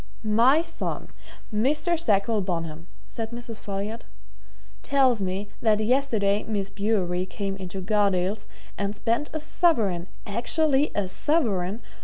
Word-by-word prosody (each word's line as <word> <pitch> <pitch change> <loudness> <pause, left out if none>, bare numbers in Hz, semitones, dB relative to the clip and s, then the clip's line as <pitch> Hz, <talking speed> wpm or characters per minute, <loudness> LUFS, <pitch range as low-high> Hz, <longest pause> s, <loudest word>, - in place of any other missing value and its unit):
"My 235 +9 +4
son, 335 -1 -4 0.4
Mr. 300 +10 +2
Sackville 215 -6 +2
Bonham," 165 -3 -4 0.2
said 225 -1 -5
Mrs. 235 -1 -7
Folliot, 205 +3 -4 0.8
"tells 260 -5 +3
me 190 +2 -2
that 215 -2 +3
yesterday 215 -4 +2
Miss 200 -3 -2
Bewery 190 -3 0
came 195 +1 -3
into 190 0 -6
Gardales' 200 0 +1 0.3
and 200 +1 -1
spent 235 +8 0
a 315 - -3
sovereign 225 - +1 0.2
actually 275 +7 +2
a 205 -2 0
sovereign! 210 - 0
210 Hz, 120 wpm, -26 LUFS, 195-245 Hz, 0.8 s, My